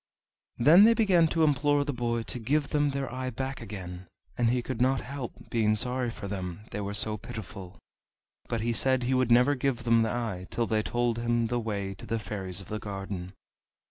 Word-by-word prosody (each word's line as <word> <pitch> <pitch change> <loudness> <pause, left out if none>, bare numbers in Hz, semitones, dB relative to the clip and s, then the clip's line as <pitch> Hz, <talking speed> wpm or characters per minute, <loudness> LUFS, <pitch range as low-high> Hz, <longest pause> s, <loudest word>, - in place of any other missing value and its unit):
Then 165 - +7
they 230 +1 +6
began 185 -8 +4
to 160 +1 +1
implore 145 -1 +2
the 145 - -2
boy 120 -1 -1
to 125 - -4
give 140 +5 0
them 145 -1 +2
their 135 -2 -3
eye 130 0 -3
back 135 +1 -4
again, 90 -2 -8 0.3
and 120 -2 +2
he 125 0 0
could 125 -2 -4
not 130 +1 +2
help 135 -1 -8
being 110 -2 +2
sorry 125 +2 -1
for 105 -3 -7
them, 95 -2 -5
they 105 - -3
were 100 +1 -3
so 105 0 +2
pitiful. 110 -4 -9 0.7
But 115 -2 -1
he 115 +1 0
said 130 +2 +3
he 125 +2 0
would 130 -2 +2
never 125 +4 +5
give 130 -2 -1
them 115 -1 +4
the 110 - +1
eye 110 -7 -3
till 120 - -1
they 110 -1 +1
told 120 +1 -1
him 120 0 +1
the 120 0 0
way 100 -4 -3
to 95 - -12
the 115 - -1
Fairies 95 -4 -4
of 95 - -11
the 110 - -3
Garden. 95 -3 -6
120 Hz, 210 wpm, -28 LUFS, 105-130 Hz, 0.7 s, Then